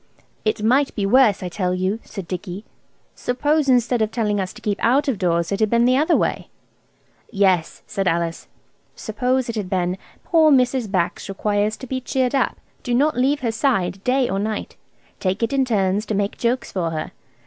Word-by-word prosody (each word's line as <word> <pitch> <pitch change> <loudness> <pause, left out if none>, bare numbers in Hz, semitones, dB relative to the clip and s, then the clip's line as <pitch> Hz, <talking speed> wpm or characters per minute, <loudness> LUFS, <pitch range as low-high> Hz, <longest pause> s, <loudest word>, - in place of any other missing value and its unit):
"It 215 0 -1
might 265 +5 +2
be 205 - -1
worse, 210 -3 +4
I 180 - -3
tell 180 0 -1
you," 190 +4 -1
said 195 -5 -8
Dicky. 185 +2 -6 0.5
"Suppose 290 +3 0
instead 245 -1 +3
of 215 - +2
telling 215 -3 -1
us 185 -1 -2
to - - -13
keep 205 -2 -2
out 275 +6 +3
of 245 -8 0
doors 170 -2 0
it 200 - -1
had 215 -1 +2
been 235 +1 +3
the 255 +1 +4
other 310 +5 +3
way?" - - -1 0.8
"Yes," 190 -6 +1
said 195 -3 -2
Alice, 170 -1 -1 0.5
"suppose 250 +4 -1
it 230 - -4
had 205 -4 -3
been, 180 0 -1 0.2
'Poor 320 -3 +4
Mrs. 250 -4 +2
Bax 185 0 -1
requires 205 +2 0
to - - -8
be 260 +1 -3
cheered 255 0 0
up. 275 - +1 0.2
Do 245 -2 -1
not 295 +5 +2
leave 275 +4 +1
her 235 -3 0
side 200 -6 0
day 255 0 +2
or 195 - -1
night. 215 +1 -3 0.4
Take 190 +3 -1
it 230 - 0
in 270 -1 +2
turns 205 -2 0
to 215 - -1
make 200 0 -1
jokes 245 +1 -1
for 175 -3 -1
her. 155 -1 -4
215 Hz, 195 wpm, -21 LUFS, 195-255 Hz, 0.8 s, worse